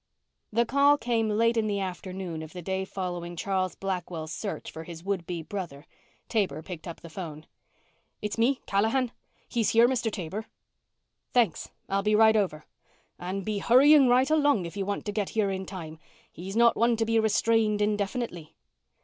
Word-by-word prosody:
The 235 Hz, +2 st, +2 dB
call 280 Hz, +4 st, +4 dB
came 230 Hz, -4 st, 0 dB
late 230 Hz, +2 st, +2 dB
in 220 Hz, -1 st, +2 dB
the 200 Hz, -1 st, -1 dB
afternoon 185 Hz, -3 st, -5 dB
of 160 Hz, 0 st, -9 dB
the 180 Hz, -, -6 dB
day 190 Hz, +1 st, -2 dB
following 175 Hz, -3 st, -5 dB
Charles 185 Hz, +1 st, -1 dB
Blackwell's 175 Hz, -4 st, -4 dB
search 200 Hz, +3 st, -5 dB
for 160 Hz, -, -8 dB
his 165 Hz, 0 st, -9 dB
would 190 Hz, -3 st, -2 dB
be 170 Hz, -2 st, -4 dB
brother. 160 Hz, -5 st, -6 dB, 0.4 s
Taber 185 Hz, -9 st, -1 dB
picked 175 Hz, -2 st, -8 dB
up 170 Hz, -, -8 dB
the 170 Hz, -, -10 dB
phone. 160 Hz, -3 st, -7 dB, 0.7 s
"It's 210 Hz, 0 st, -3 dB
me 245 Hz, +4 st, +2 dB
Callahan. 225 Hz, +5 st, +1 dB, 0.4 s
He's 230 Hz, -3 st, 0 dB
here, 230 Hz, +1 st, +6 dB
Mr. 240 Hz, -3 st, 0 dB
Taber." 200 Hz, +3 st, -5 dB, 0.9 s
"Thanks. 240 Hz, -3 st, +2 dB, 0.2 s
I'll 195 Hz, 0 st, 0 dB
be 210 Hz, +1 st, +2 dB
right 220 Hz, 0 st, +6 dB
over." 175 Hz, -8 st, 0 dB, 0.5 s
"And 185 Hz, +2 st, -4 dB
be 215 Hz, -2 st, -1 dB
hurrying 270 Hz, +6 st, +6 dB
right 255 Hz, +4 st, +4 dB
along 290 Hz, -, +3 dB
if 170 Hz, -, -7 dB
you 200 Hz, -1 st, -3 dB
want 205 Hz, -, -3 dB
to 205 Hz, -, -2 dB
get 205 Hz, -1 st, -2 dB
here 210 Hz, -3 st, 0 dB
in 190 Hz, -1 st, -4 dB
time. 160 Hz, -5 st, -8 dB, 0.3 s
He's 190 Hz, +4 st, -7 dB
not 235 Hz, 0 st, +5 dB
one 235 Hz, +1 st, +3 dB
to 225 Hz, -, +1 dB
be 225 Hz, 0 st, +2 dB
restrained 220 Hz, 0 st, +2 dB
indefinitely." 205 Hz, -4 st, -2 dB
200 Hz, 175 wpm, -28 LUFS, 180-225 Hz, 0.9 s, here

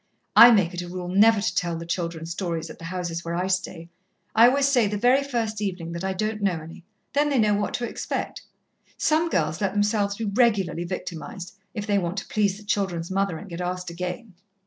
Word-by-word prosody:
I 235 Hz, -, +11 dB
make 195 Hz, -7 st, +3 dB
it 175 Hz, -, -3 dB
a 175 Hz, -, -7 dB
rule 180 Hz, 0 st, -5 dB
never 210 Hz, +4 st, +5 dB
to -, -, -1 dB
tell 175 Hz, -2 st, 0 dB
the 165 Hz, -, -7 dB
children 170 Hz, -1 st, -3 dB
stories 170 Hz, -1 st, -4 dB
at -, -, -13 dB
the 165 Hz, -, -9 dB
houses 170 Hz, -1 st, -4 dB
where 170 Hz, 0 st, -3 dB
I 180 Hz, +1 st, 0 dB
stay. 185 Hz, -3 st, -2 dB, 0.5 s
I 230 Hz, +2 st, +8 dB
always 275 Hz, +2 st, +3 dB
say, 245 Hz, -6 st, +3 dB
the 210 Hz, +1 st, -2 dB
very 250 Hz, +6 st, +4 dB
first 225 Hz, -6 st, -2 dB
evening, 180 Hz, -5 st, -3 dB
that 170 Hz, +1 st, -5 dB
I 190 Hz, -, 0 dB
don't 215 Hz, +3 st, -2 dB
know 185 Hz, -5 st, +1 dB
any. 165 Hz, +2 st, -11 dB, 0.3 s
Then 295 Hz, +1 st, +2 dB
they 280 Hz, -, +1 dB
know 215 Hz, -3 st, +3 dB
what 205 Hz, 0 st, -1 dB
to 240 Hz, -, -2 dB
expect. -, -, -4 dB, 0.6 s
Some 320 Hz, +2 st, +2 dB
girls 155 Hz, -, 0 dB
let 195 Hz, -2 st, 0 dB
themselves 205 Hz, -1 st, +1 dB
be 225 Hz, -, -3 dB
regularly 200 Hz, -6 st, +1 dB
victimized, 180 Hz, 0 st, -6 dB, 0.2 s
if 210 Hz, -2 st, -3 dB
they 205 Hz, -1 st, +2 dB
want 175 Hz, +1 st, -3 dB
to 195 Hz, -, -4 dB
please 210 Hz, -6 st, +1 dB
the 210 Hz, -, -13 dB
children's 190 Hz, -4 st, -2 dB
mother, 195 Hz, -3 st, 0 dB
and 205 Hz, -, -10 dB
get 170 Hz, -1 st, -6 dB
asked 180 Hz, 0 st, -3 dB
again. 180 Hz, +5 st, -5 dB
190 Hz, 220 wpm, -25 LUFS, 175-215 Hz, 0.6 s, I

